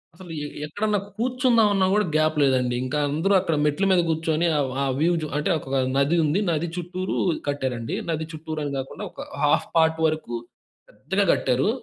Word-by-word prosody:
అసలు 175 -1 -11
ఎ - - -4 0.2
ఎక్కడన్నా 205 +7 -1 0.2
కూర్చుందామన్న 230 -5 +3
కూడా 210 0 +3
గ్యాప్ 155 0 +2
లేదండి. 125 -2 +2
ఇంకా 145 +4 -2
అందరూ 165 +8 +1
అక్కడ 165 -4 0
మెట్ల 150 +6 +1
మీద 180 -2 +5
కూర్చొని 160 +1 +1
ఆహ్, 135 -3 0
ఆహ్ 135 -1 0
వ్యూ 165 +3 +3 0.3
అంటే 150 +6 -1
ఒక 135 -1 -4 0.2
నది 140 +5 +3
ఉంది. 155 +5 +1
నది 165 +1 -1
చుట్టూరు 180 +2 -3 0.3
కట్టారండి. 130 -5 -2
నది 160 -1 -1
చుట్టూరు 155 0 -5
అని 140 - -3
కాకుండా 135 - -6
ఒక - - -9 0.2
హాల్ఫ్ - - +3
పార్ట్ 160 0 +3
వరకు 155 -6 -3 0.6
పెద్దగా 190 - -1
కట్టారు. 130 +7 +1
160 Hz, 165 wpm, -24 LUFS, 140-185 Hz, 0.6 s, మీద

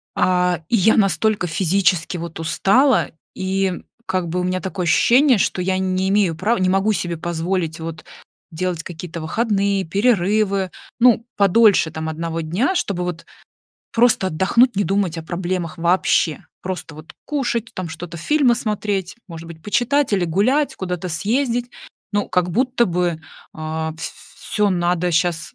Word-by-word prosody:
А, 180 -2 +2
и 235 - +1
я 220 +1 +4
настолько 205 -1 +2
физически, 180 0 +1
вот, 170 -1 -7
устала, 255 - +3 0.3
и 190 -1 -1 0.2
как 185 -2 -1
бы 180 +2 -1
у - - -2
меня 185 0 -1
такое 190 -1 -4
ощущение, 250 - +4
что 185 - 0
я 185 +1 0
не 190 0 0
имею 195 -5 +2
права, 205 +8 0
не 185 0 +1
могу 195 +3 +2
себе 175 -3 -2
позволить, 170 0 -2
вот, 160 0 -7 0.5
делать 170 0 -3
какие-то 170 -1 -7
выходные, 200 +1 0
перерывы, 200 0 +1 0.3
ну, 235 -1 +4
подольше, 200 -3 +4
там, 160 0 -4
одного 165 +1 -3
дня, 190 - 0
чтобы 190 - -1
вот 175 -2 -5 0.7
просто 230 -4 +3
отдохнуть, 195 +8 +2
не 205 - +2
думать 195 -4 0
о - - -5
проблемах 175 0 -3
вообще. 170 -3 +1 0.2
Просто, 180 -4 -5
вот, 155 +1 -12
кушать, 240 -6 -2
там 185 -2 -4
что-то, 170 +1 -8
фильмы 275 - +3
смотреть, 210 -4 -2
может 165 -1 -9
быть 160 -1 -11
почитать 245 +4 +1
или 190 -3 +2
гулять, 260 - +1
куда-то 180 -1 -4
съездить. 240 - -1 0.4
Ну, 205 -1 0
как 180 -1 +1
будто 250 +4 +2
бы, 175 -2 -1 0.3
а, 160 0 -4
ф 165 - -6 0.3
всё 210 -1 0
надо 175 -1 0
щас 170 0 0
185 Hz, 155 wpm, -20 LUFS, 170-210 Hz, 0.7 s, я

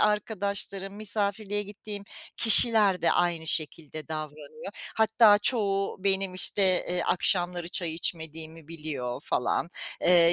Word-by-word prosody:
arkadaşlarım, 200 -2 0
misafirliğe 205 0 -2
gittiğim 205 0 -8 0.3
kişiler 215 -5 +3
de 170 - +3
aynı 170 -2 0
şekilde 155 -1 -2
davranıyor. 155 - -7 0.2
Hatta 220 -1 +5
çoğu 200 -4 0
benim, 195 -1 +1
işte, 195 +2 +1 0.3
eee, 180 0 0
akşamları 175 -1 +2
çay 170 -3 0
içmediğimi 160 -1 -2
biliyor 145 -7 -5
falan. 145 +6 -1 0.3
Eee, 170 -1 +6
185 Hz, 110 wpm, -27 LUFS, 165-205 Hz, 0.3 s, Eee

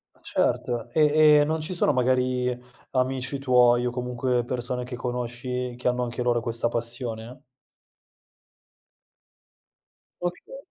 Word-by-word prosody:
Ma - - -28
certo, 120 -2 -1
e 150 -1 +6
e - - +5
non 160 +2 -1
ci 155 +4 -4
sono, 175 - +2
magari, 125 0 +1 0.3
amici 130 +1 -1
tuoi, 125 -2 +4
o 125 - 0
comunque 125 0 -1
persone 125 0 -3
che 125 0 -6
conosci, 125 0 -4
che 125 - -3
hanno 125 0 -1
anche 120 0 -4
loro 120 -1 +2
questa 115 +1 -1
passione? 115 0 -3 2.8
Okay. 180 - -5
125 Hz, 125 wpm, -25 LUFS, 120-130 Hz, 2.8 s, e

